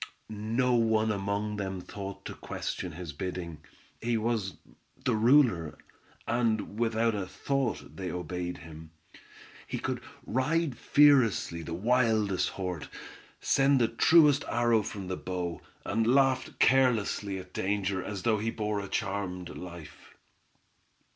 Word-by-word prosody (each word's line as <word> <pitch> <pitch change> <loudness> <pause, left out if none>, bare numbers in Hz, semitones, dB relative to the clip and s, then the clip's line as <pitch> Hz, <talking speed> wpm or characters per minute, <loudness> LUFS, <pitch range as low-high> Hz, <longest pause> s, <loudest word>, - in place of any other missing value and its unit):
No 115 +4 0
one 110 -2 +3
among 100 +1 -2
them 95 -2 -3
thought 100 +2 -8
to - - -5
question 90 -3 -5
his 85 -2 -7
bidding; 85 -1 -5 0.4
he 120 0 +1
was 110 -4 -1 0.5
the 125 - +2
ruler, 110 - +4 0.5
and 110 -3 0
without 115 0 +2
a 100 -3 -3
thought 135 +3 -2
they 95 -2 -4
obeyed 90 0 -4
him. 80 0 -11 0.8
He - - -3
could - - -3 0.2
ride 140 +4 0
fearlessly 125 - +4
the 80 +1 -5
wildest 110 -2 +2
horse, 90 -4 -4 0.5
send 135 0 +3
the 115 - +4
truest 150 +4 +5
arrow 120 -2 +3
from 100 -2 -6
the 95 - -3
bow, 90 -2 -4 0.2
and 110 +2 0
laughed 130 +1 +2
carelessly 115 -6 +2
at 95 0 -10
danger 95 -1 -1
as 100 -2 -5
though 110 -3 +2
he 110 +2 -1
bore 105 -2 -2
a 100 - -5
charmed 95 -4 -3
life. 85 -4 -10
105 Hz, 130 wpm, -29 LUFS, 95-120 Hz, 0.8 s, truest